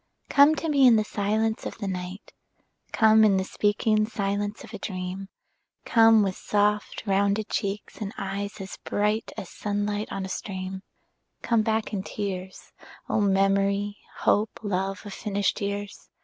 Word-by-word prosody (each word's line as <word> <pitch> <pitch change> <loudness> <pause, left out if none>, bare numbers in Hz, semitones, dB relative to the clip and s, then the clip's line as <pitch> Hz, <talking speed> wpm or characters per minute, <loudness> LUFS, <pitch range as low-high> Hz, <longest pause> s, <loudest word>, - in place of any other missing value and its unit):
Come 285 +2 +6
to 325 - -3
me 280 -4 +5
in 235 - +7
the 215 - +3
silence 220 +1 -1
of - - -8
the 205 - -4
night; 185 +1 -6 0.6
Come 220 -1 +5
in 200 -3 +5
the 190 - +1
speaking 215 +2 +1
silence 205 0 -2
of 230 -2 -12
a 210 - -6
dream; 190 0 -5 0.6
Come 225 -2 +6
with 190 -2 -1
soft 210 0 0
rounded 200 +1 +1
cheeks 200 +1 -3
and 200 -1 -3
eyes 200 +1 -4
as 195 0 -7
bright 210 +2 0
As 185 - -6
sunlight 205 0 -2
on 195 -1 -3
a - - -5
stream; 190 0 -5 0.6
Come 230 -2 +3
back 220 0 -1
in 195 - -1
tears, 190 -2 -6 0.4
O - - +2
memory, 200 +1 +2 0.2
hope, 210 +1 +2
love 195 0 -2
of 205 - -7
finished 205 -1 -1
years. 200 0 -4
205 Hz, 155 wpm, -26 LUFS, 195-215 Hz, 0.6 s, in